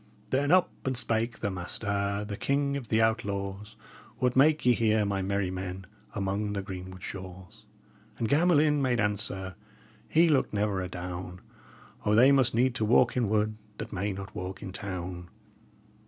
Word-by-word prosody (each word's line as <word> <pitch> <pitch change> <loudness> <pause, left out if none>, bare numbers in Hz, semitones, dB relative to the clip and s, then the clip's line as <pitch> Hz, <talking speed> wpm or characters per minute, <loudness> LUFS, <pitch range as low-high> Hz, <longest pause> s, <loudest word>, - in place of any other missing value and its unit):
"Then 145 +3 +2
up 185 0 +5
and 130 -1 -1
spake 115 -1 0
the 100 - -1
master, 100 +2 -2
the 100 - -4
king 140 +4 0
of 135 -4 -5
the 110 +1 +3
outlaws: 105 -1 -2 0.4
'What 125 0 +1
make 150 +2 +4
ye 125 - +6
here, 110 -2 +2
my 100 -1 -1
merry 95 -1 -1
men, 95 0 -5 0.3
among 100 +1 -1
the 100 -1 -3
greenwood 95 -1 -8
shaws?' 95 +3 -9 0.5
And 115 - -1
Gamelyn 150 0 +4
made 125 -3 +1
answer 100 -2 -2 0.6
he 165 +2 +5
looked 145 -8 +2
never 100 -2 0
adown: 90 0 -6 0.6
'O, 105 - +2
they 125 +5 +7
must 130 -4 +4
need 125 +1 +3
to 110 - -2
walk 120 +3 +4
in 120 -5 +1
wood 110 0 +1 0.2
that - - -6
may 100 +2 -1
not 95 0 -7
walk 90 +1 -6
in 95 - -6
town!'" 90 -2 -6
105 Hz, 165 wpm, -29 LUFS, 95-120 Hz, 0.6 s, they